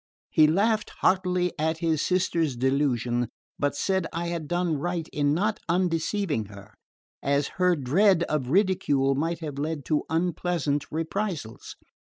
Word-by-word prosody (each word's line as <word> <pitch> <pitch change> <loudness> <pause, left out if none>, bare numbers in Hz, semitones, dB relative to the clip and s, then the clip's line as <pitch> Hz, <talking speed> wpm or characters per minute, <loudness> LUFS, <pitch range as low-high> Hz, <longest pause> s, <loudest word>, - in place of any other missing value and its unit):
He 155 -1 +6
laughed 210 +6 +2
heartily 180 -1 +2
at 160 +1 0
his 160 -3 0
sister's 170 -6 +1
delusion, 125 -2 +1 0.3
but 145 0 0
said 190 +2 0
I 170 +1 -3
had 170 -3 -4
done 175 -3 0
right 175 0 -2
in 145 -1 +1
not 210 +7 0
undeceiving 170 - 0
her, 100 -1 -13 0.5
as 140 +1 +1
her 180 -1 +4
dread 170 +6 +3
of 150 -6 -2
ridicule 145 -7 +2
might 165 +4 -2
have 145 -3 -5
led 150 -1 -3
to 155 -2 +1
unpleasant 165 -3 0
reprisals. 165 - -4
160 Hz, 140 wpm, -26 LUFS, 145-180 Hz, 0.5 s, He